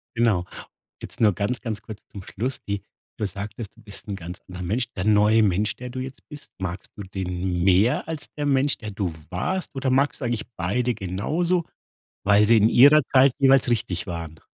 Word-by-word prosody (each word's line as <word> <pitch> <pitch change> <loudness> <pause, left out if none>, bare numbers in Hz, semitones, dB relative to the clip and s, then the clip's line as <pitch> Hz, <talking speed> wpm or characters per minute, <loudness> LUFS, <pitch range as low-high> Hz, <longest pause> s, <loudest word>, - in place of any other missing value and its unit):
Genau. 110 -7 +2 0.6
Jetzt - - -8
nur 105 -3 +5
ganz, 105 +7 -2
ganz 110 -3 -4
kurz 105 0 -10
zum 100 -3 -10
Schluss, 120 +9 -4
die 100 -1 -3 0.4
du 105 - -1
sagtest, 105 +3 -6
du - - -17
bist 105 0 -11
'n 100 - -3
ganz 90 0 -8
anderer 90 0 -7
Mensch. 120 +7 -1
Der 95 +1 -3
neue 110 +1 +5
Mensch, 100 +1 +1
der 125 0 -8
du 130 +1 -6
jetzt 130 +1 -8
bist, 150 -1 -11
magst 90 -1 -5
du 100 - -7
den 90 -2 -3
mehr 100 - +3
als 155 -3 -6
der 145 -1 -2
Mensch, 140 0 +2
der 110 -2 -7
du 95 -4 -2 0.2
warst 175 - -2
oder 130 -1 -1
magst 140 +3 +1
du - - -2
eigentlich 120 -2 -2
beide 120 +8 0
genauso, 155 - -1 0.6
weil 105 +1 +5
sie 115 -1 +6
in 110 +2 +5
ihrer 145 +4 +7
Zeit 135 0 +7
jeweils 135 -2 +5
richtig 95 -6 -1
waren? 80 -2 -6
105 Hz, 200 wpm, -24 LUFS, 95-130 Hz, 0.6 s, ihrer